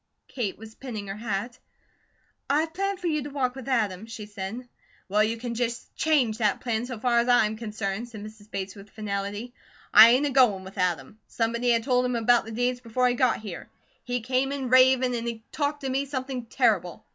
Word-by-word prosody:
Kate 230 -7 -3
was 220 +1 -11
pinning 220 -5 -7
her 195 0 -5
hat. 230 +3 -4 0.9
"I 290 +2 +3
have 320 0 -4
planned 395 +1 -2
for 365 - -8
you 305 -3 +1
to 285 - -6
walk 265 -3 -1
with 265 -1 -9
Adam," 215 -5 0
she 225 -2 -7
said. 205 +4 -6 0.4
"Well, 210 +2 +3
you 225 +2 -1
can 235 0 -4
just 235 0 -3
change 260 -8 +2
THAT 210 -3 +2
plan, 235 -1 -2
so 250 -4 -6
far 240 0 +3
as 235 - +1
I 245 -3 +5
am 210 +1 -2
concerned," 215 0 -4
said 215 -3 -9
Mrs. 215 0 -12
Bates 190 -2 -4
with 200 0 -13
finality. 205 +2 -4 0.4
"I 225 - +11
ain't 255 +5 +4
a 285 - 0
goin' 245 -8 +4
with 190 +1 -10
Adam. 180 +1 -1
Somebody 235 +1 -1
had 230 -1 +3
told 250 -1 +2
him 250 -1 -1
about 235 +1 +3
the 225 - -8
deeds 245 +2 0
before 250 +1 0
he - - +1
got 245 -2 +1
here. 200 -6 -8 0.3
He 245 -1 -2
came 255 +3 0
in 270 -3 -3
ravin', 255 0 +5
and 235 -1 -3
he 225 -1 -5
talked 290 -1 -2
to 270 - -3
me 275 +2 -1
something 260 -3 -4
terrible. 210 -9 +1
235 Hz, 215 wpm, -26 LUFS, 215-255 Hz, 0.9 s, I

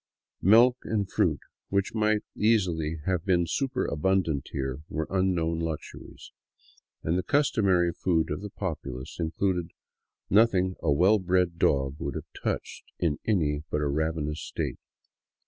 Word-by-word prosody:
Milk 120 +6 +6
and 105 -3 -1
fruit, - - +1 0.3
which 100 0 0
might 110 -1 +1
easily 90 -8 +1
have 90 -3 0
been 90 -3 +2
superabundant 90 - 0
here, 65 -1 -3
were 80 0 -2
unknown 90 -4 +1
luxuries, 80 -2 -6 0.7
and 85 +3 +1
the - - +1
customary 95 - +2
food 80 -1 0
of - - -3
the 105 - -6
populace 70 -10 -6
in 80 - 0
cluded 90 -1 -1 0.6
nothing 95 -4 +4
a - - -4
wellbred 90 +1 +3
dog 70 0 +2
would 70 -4 -4
have - - -5 0.2
touched - - -3
in 80 -4 0
any 75 -9 +1
but 75 - 0
a - - 0
ravenous 75 +1 -1
state. - - -4
90 Hz, 135 wpm, -27 LUFS, 80-100 Hz, 0.7 s, Milk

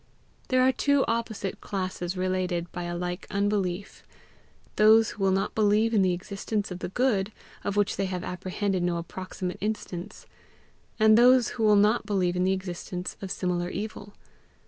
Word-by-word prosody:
There 255 -1 +3
are 260 - +5
two 285 +1 +2
opposite 225 -4 -2
classes 185 -2 -3
related 185 -2 -1
by 175 -1 -5
a 175 0 -3
like 180 +1 -4
unbelief 200 -1 -1 0.7
those 220 +1 +6
who 205 - -10
will 195 - +4
not 195 +1 0
believe 215 +1 +3
in 210 - +4
the 185 -1 +3
existence 200 +3 -3
of 180 - -5
the - - -4
good 215 -3 +1 0.3
of 200 0 -2
which 205 -1 +1
they 195 - 0
have 180 -1 -4
apprehended 185 +1 -2
no 175 -1 0
approximate 180 +1 -5
instance, 210 -3 -4 0.7
and 220 +1 +6
those 250 0 +6
who 225 - -3
will 210 -1 +6
not 210 +2 +3
believe 185 -4 +1
in 180 - +1
the 190 - +2
existence 180 -1 -5
of 195 - -5
similar 180 -1 -1
evil. 205 +1 -6
195 Hz, 170 wpm, -27 LUFS, 180-215 Hz, 0.7 s, those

